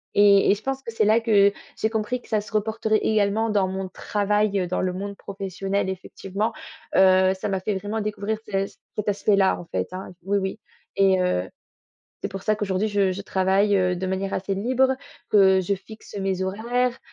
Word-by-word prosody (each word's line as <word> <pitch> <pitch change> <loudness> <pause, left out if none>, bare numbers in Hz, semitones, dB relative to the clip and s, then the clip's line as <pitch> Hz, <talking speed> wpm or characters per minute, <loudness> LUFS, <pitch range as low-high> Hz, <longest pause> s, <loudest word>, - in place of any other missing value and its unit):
et 200 -1 +6
et - - +4
je 205 - -11
pense 270 0 -2
que 230 - -7
c'est 215 -2 +2
là 220 +2 +5
que 205 -3 +4 0.3
j'ai 220 - +1
compris 225 +3 -2
que - - -19
ça 215 -2 +1
se 205 - -13
reporterait 220 +1 +1
également 215 +1 +1
dans 200 -3 +2
mon 190 0 -4
travail, 205 0 0
heu, 180 - -1
dans 180 - -1
le 185 -1 -1
monde 200 +2 -5
professionnel 195 0 -3
effectivement, 195 +3 -4 0.4
heu, 190 0 +5
ça 190 +2 -4
m'a 190 -1 0
fait 200 +2 -2
vraiment 205 +3 -3
découvrir 210 +1 -2
ce 195 -1 0
c - - -18 0.2
cet 210 0 -1
aspect-là 200 -1 +2
en 175 - -9
fait, 95 - -3
hein 190 +1 -6
oui 200 +1 +1
oui 190 +3 -3 0.4
et 195 -1 +4
heu, 135 - +1 0.8
c'est - - -1
pour 195 - -6
ça 215 -1 +2
qu'aujourd'hui 205 0 -1
je 200 -2 +2
je 195 +2 -5
travaille, 195 +2 +2
heu, 180 -1 +1
de 185 +1 -3
manière 190 +1 -2
assez 195 +1 -2
libre, 260 +5 +2 0.3
que 190 -2 +5
je 200 +2 0
fixe 210 +1 -11
mes 190 -1 -1
horaires, 240 +6 -1
200 Hz, 205 wpm, -24 LUFS, 190-215 Hz, 0.8 s, et